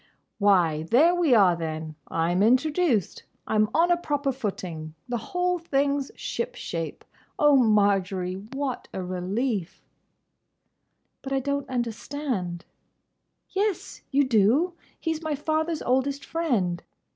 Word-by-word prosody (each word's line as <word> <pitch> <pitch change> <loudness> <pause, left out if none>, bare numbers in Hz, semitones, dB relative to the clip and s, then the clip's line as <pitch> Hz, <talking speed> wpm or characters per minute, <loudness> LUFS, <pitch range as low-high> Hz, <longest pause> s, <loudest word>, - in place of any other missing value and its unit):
"Why, 180 -7 +3
there 315 +9 +5
we 340 -8 +3
are 190 -5 +5
then! 160 -1 -4
I'm 170 +3 0
introduced! 260 - +2 0.2
I'm 215 -1 +2
on 340 +2 +3
a 350 - +4
proper 290 -4 -1
footing! 180 -10 -5
The 240 -1 -2
whole 360 -1 0
thing's 280 -3 0
ship 475 +1 -4
shape! 165 -1 -5 0.3
O 295 -1 +5
Marjory, 200 -6 +2 0.2
what 270 -2 -3
a 190 - -3
relief!" 190 +2 -2 1.4
"But 270 - -4
I 270 - +2
don't 280 +1 -2
understand—" 235 - -3 0.8
"Yes, 400 -1 -2
you 285 +1 +3
do. 260 - +3 0.3
He 325 - -1
's 315 - -7
my 315 -2 -1
father's 315 +2 -1
oldest 270 +3 0
friend. 225 - 0
255 Hz, 120 wpm, -26 LUFS, 190-295 Hz, 1.4 s, there